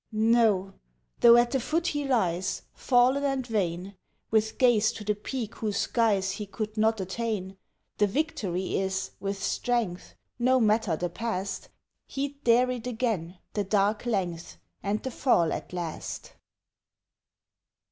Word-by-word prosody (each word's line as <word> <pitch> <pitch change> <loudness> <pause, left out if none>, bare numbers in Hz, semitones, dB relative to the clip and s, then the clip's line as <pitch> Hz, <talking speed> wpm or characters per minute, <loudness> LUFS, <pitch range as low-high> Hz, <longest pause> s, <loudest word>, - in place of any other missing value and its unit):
No! 215 -3 +3 0.5
though 235 0 +8
at 240 0 +3
the 270 - +1
foot 325 +7 -1
he 290 -4 -1
lies, 185 -8 0
Fallen 255 +3 +3
and 270 -2 0
vain, 195 -4 -2 0.4
With 220 0 +1
gaze 230 -4 +4
to 215 - -8
the 210 0 +1
peak 220 +2 -5
whose 210 -2 -2
skies 205 -5 +1
He 205 +1 -5
could 215 +1 -5
not 220 0 +2
attain, 195 0 -3 0.4
The 205 - +4
victory 195 - -1
is, 190 0 -2
with 195 0 -3
strength 230 -8 -1 0.2
No 255 +2 +4
matter 215 -5 +2
the 175 +2 -3
past! 195 -3 -4 0.4
He'd 280 +1 -4
dare 245 +2 +4
it 245 -1 -5
again, 220 -8 -2 0.2
the 205 - 0
dark 205 +3 +1
length, 180 -7 -2 0.2
And 205 +2 -2
the 260 - -3
fall 175 - +2
at - - -6
last! 175 -3 -5
215 Hz, 140 wpm, -27 LUFS, 190-240 Hz, 0.5 s, though